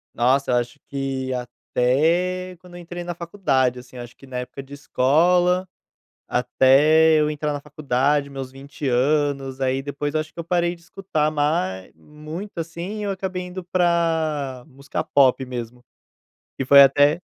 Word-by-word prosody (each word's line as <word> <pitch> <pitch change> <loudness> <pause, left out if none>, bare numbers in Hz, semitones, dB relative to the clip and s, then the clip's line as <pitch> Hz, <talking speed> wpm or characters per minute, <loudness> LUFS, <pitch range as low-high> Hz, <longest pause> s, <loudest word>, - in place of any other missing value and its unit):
Nossa, 130 +2 +2
acho 120 0 -6
que 135 -1 -3
até 165 +9 0
quando 180 -1 -15
eu - - -8
entrei 175 +1 -7
na 175 -1 -5
faculdade 135 -9 0
assim, 125 0 -14
acho 120 0 -9
que 135 - -16
na 125 -1 -6
época 125 +2 -6
de 135 +1 -18
escola, 175 +7 +2 0.6
até 145 +6 +4
eu 150 0 +2
entrar 150 0 -2
na 145 - -4
faculdade, 140 0 0
meus 135 -2 -7
20 135 0 -1
aí 130 +1 +1
depois 145 +1 -4
eu 155 - +2
acho 155 0 -8
que - - -17
eu - - -6
parei 175 0 0
de 170 - -20
escutar 170 -4 -2
mais 145 - -1
muito 155 - -9
assim, 170 +6 -5
eu 200 - -2
acabei 185 -1 -4
indo 180 0 -7
pra 160 -7 0
música 140 -1 -5
pop 135 -2 +3
mesmo. 120 -1 -7 0.8
E 135 - -1
foi 140 +2 +8
até 145 +4 +4
145 Hz, 155 wpm, -22 LUFS, 130-170 Hz, 0.8 s, foi